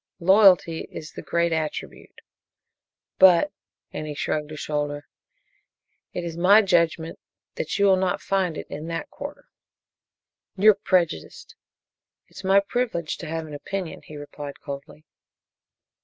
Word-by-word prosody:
Loyalty 185 -3 +5
is 155 - -8
the - - -8
great 170 0 0
attribute 155 -1 -5 1.0
but," 190 - +6 0.4
and 155 - -5
he 150 - -5
shrugged 150 +1 -2
a - - -6
shoulder, 145 -1 -3 1.0
"it 175 - -4
is 170 -1 -5
my 195 +6 +6
judgment 170 -3 +1 0.3
that - - -3
you 200 - +3
will 190 -1 +5
not 185 -1 0
find 185 -5 -1
it - - -6
in 155 +2 -7
that 165 0 -5
quarter." - - -8 1.1
"You're 215 +3 +7
prejudiced." 180 - -1 0.7
"It - - -18
is - - -8
my 195 +1 +5
privilege 200 -6 -2
to 170 - -7
have 160 0 -3
an 155 - -10
opinion," 180 +4 -5
he 150 - -11
replied 145 -1 -8
coldly. 140 +2 -9
170 Hz, 140 wpm, -24 LUFS, 155-190 Hz, 1.1 s, You're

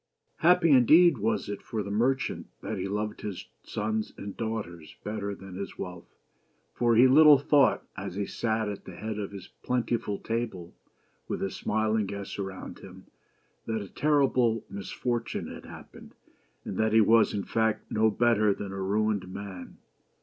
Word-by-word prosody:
Happy 170 -1 +4
indeed 150 +3 +6
was 110 +2 0
it 100 -1 -5
for 110 -2 -4
the 100 - -6
merchant 130 +5 0 0.2
that - - -4
he 95 - -2
loved 105 +2 -3
his 100 -4 -6
sons 110 +1 -3
and 100 -1 -7
daughters 105 -8 -5
better 100 -1 -3
than 95 -1 -11
his 100 +2 -6
wealth; 90 -1 -8 0.6
for 120 - +2
he 125 +3 +7
little 150 +2 +8
thought, 140 0 +3
as - - -6
he 100 0 -1
sat 110 0 -1
at 100 -1 -6
the 95 - -9
head 105 +2 -5
of 100 - -3
his 100 -2 -9
plentiful 120 -4 -1
table 110 -7 -4
t - - -32 0.4
with - - -3
his 95 - -3
smiling 110 -1 0
guests 100 0 -6
around 95 -1 -6
him, - - -13 0.6
that 110 -1 -1
a 100 - -7
terrible 130 -6 +2
misfortune 115 +4 -3
had - - -9
happened, - - -12 0.5
and 95 - -5
that 110 0 +2
he 110 - +7
was, 110 +1 +5
in 100 -1 -2
fact, 110 -1 -1
no 110 +1 +3
better 110 -2 +3
than 100 -2 -6
a 95 0 -5
ruined 100 -1 0
man. 95 -2 -8
110 Hz, 170 wpm, -28 LUFS, 100-115 Hz, 0.6 s, little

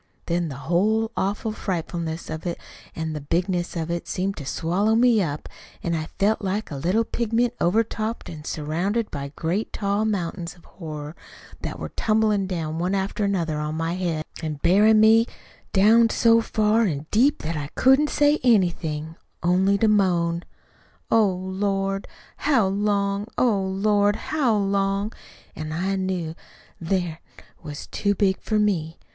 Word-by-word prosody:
Then 170 -1 -1
the 140 - -6
whole 215 +6 +2
awful 205 +3 -1
frightfulness 170 -5 -4
of 160 +2 -5
it 170 - -2 0.4
an' 160 -1 -3
the 150 - -5
bigness 175 +4 -1
of 165 0 -2
it 170 0 -3
seemed 195 +2 -2
to 140 - -7
swallow 195 +10 +1
me 235 -2 +4
up, 150 -4 -3 0.4
an' 170 - -1
I 160 -1 -2
felt 215 +3 +2
like 200 0 -2
a - - -4
little 180 +11 +1
pigment 235 +1 0
overtopped 220 +3 0
an' 155 -2 -8
surrounded 175 +10 -2
by 140 -1 -5
great 175 +7 -2
tall 200 +1 0
mountains 175 -4 -2
of 175 - -21
horror 155 -2 -8 0.5
that - - -4
were - - -5
tumblin' 215 -3 +1
down 165 -3 -3
one 180 +3 0
after 195 +2 -1
another 170 -6 0
on 150 +1 -3
my 165 +1 -1
head, 170 -4 -2 0.2
an' 155 -2 -3
bury 205 +5 +5
in' 220 -1 +6
me 225 +2 +6 0.4
down 225 +4 +5
so 230 +1 +4
far 215 0 +2
an' 155 -9 0
deep 260 +7 +3
that 165 +2 -2
I 145 -2 -3
couldn't 265 +3 +4
say 295 +1 +3
anything, 165 -9 +1 0.3
only 190 +3 +3
to 220 - +2
moan, 175 -5 +2 0.7
'Oh, 225 -2 +5
Lord, 195 +1 -2 0.3
how 270 -8 +3
long, 200 +1 0
oh, 220 -6 +3
Lord, 205 +2 +2
how 260 -7 0
long?' 195 +1 0 0.4
An' 155 0 -5
I 185 +5 -1
knew 185 -4 -2 0.5
then't 170 -1 -1 0.4
was 150 -3 -7
too 205 -1 -1
big 190 -1 +1
for 215 - 0
me. 175 -6 0
190 Hz, 160 wpm, -24 LUFS, 165-215 Hz, 0.7 s, in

